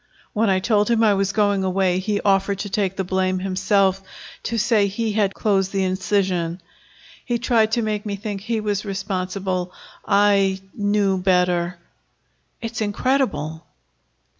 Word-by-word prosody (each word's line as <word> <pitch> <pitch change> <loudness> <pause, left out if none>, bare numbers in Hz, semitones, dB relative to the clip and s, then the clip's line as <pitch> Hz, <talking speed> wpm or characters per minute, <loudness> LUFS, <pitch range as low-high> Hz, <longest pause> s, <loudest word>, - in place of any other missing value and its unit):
When 220 0 +2
I 190 - +3
told 210 +2 +1
him 230 -1 +3
I 215 -2 +5
was 195 0 0
going 205 -2 +1
away, 185 -1 +1
he 205 +2 -1
offered 195 0 +2
to 205 - -5
take 195 -2 0
the 190 - -1
blame 185 0 0
himself, 195 +1 +1 0.4
to 230 - -3
say 215 -2 +3
he 220 +3 -2
had 205 -2 0
closed 195 -3 +1
the 195 -1 0
incision. 185 -2 0 0.6
He 240 -2 -1
tried 230 -2 +2
to 235 - +1
make 210 -1 -2
me 205 -2 -3
think 200 -1 -5
he 225 +2 -2
was 205 -1 -1
responsible. 190 -2 -3 0.3
I 200 -2 +3
knew 205 -2 +1
better." 180 -1 +1 0.9
"It's 230 0 -4
incredible." 205 - -1
195 Hz, 150 wpm, -22 LUFS, 185-210 Hz, 0.9 s, I